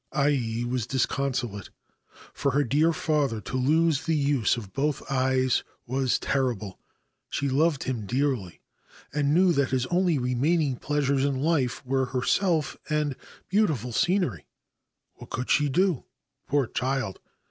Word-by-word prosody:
Ai 130 -6 +1
was 120 -2 -2
disconsolate. 130 -5 -1 0.6
For 140 - -1
her 145 +2 +3
dear 150 +7 +3
father 150 -8 0
to 105 - -6
lose 155 +3 +2
the 165 - +2
use 140 -6 +2
of 105 -5 -8
both 145 +1 -1
eyes 130 -1 +2 0.2
was 130 0 +1
terrible. 120 -8 -2 0.5
She 140 - -1
loved 145 +2 +2
him 115 -6 -3
dearly, 125 -7 -1 0.5
and 145 -1 +1
knew 180 +3 +5
that 140 -3 +1
his 130 -1 0
only 175 -3 +2
remaining 135 +3 +1
pleasures 140 -1 0
in 140 -1 +1
life 140 -5 0
were 130 +1 +1
herself 155 +5 0
and 150 -2 0 0.3
beautiful 155 - +1
scenery> 175 - 0 0.7
What - - -12
could 125 - -3
she 145 -1 +3
do, 180 0 +1 0.4
poor 145 -1 +2
child 130 -4 -2
135 Hz, 135 wpm, -26 LUFS, 125-150 Hz, 0.7 s, knew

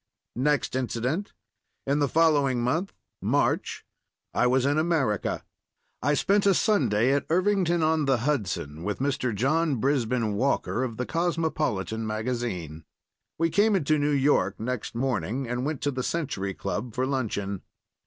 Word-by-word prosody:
Next 145 0 +1
incident. 130 - -2 0.5
In 140 +2 +1
the 145 - +2
following 145 -6 +3
month—March—I 155 -3 -2
was 130 +1 +2
in 145 +2 +2
America. 155 - 0 0.6
I 145 +2 +2
spent 200 +5 +2
a 195 - +5
Sunday 130 - +2
at 140 - 0
Irvington 180 -1 +2
on 155 -1 +2
the 135 -2 +3
Hudson 90 - -2
with 105 +2 -2
Mr. 135 -2 -1
John 150 +7 +1
Brisben 125 -3 0
Walker, 125 +1 0
of 115 -4 -4
the 125 - -2
Cosmopolitan 155 - -1
magazine. 110 - -3 0.5
We 165 0 +1
came 205 +4 +3
into 155 -4 +2
New 145 +1 +1
York 145 0 +2
next 120 0 -4
morning, 125 0 -1
and 125 +3 -2
went 155 -3 -3
to 145 - 0
the 130 -1 -3
Century 105 - -2
Club 105 +5 -4
for 130 +1 +1
luncheon. 105 -8 -2
130 Hz, 140 wpm, -26 LUFS, 115-155 Hz, 0.6 s, a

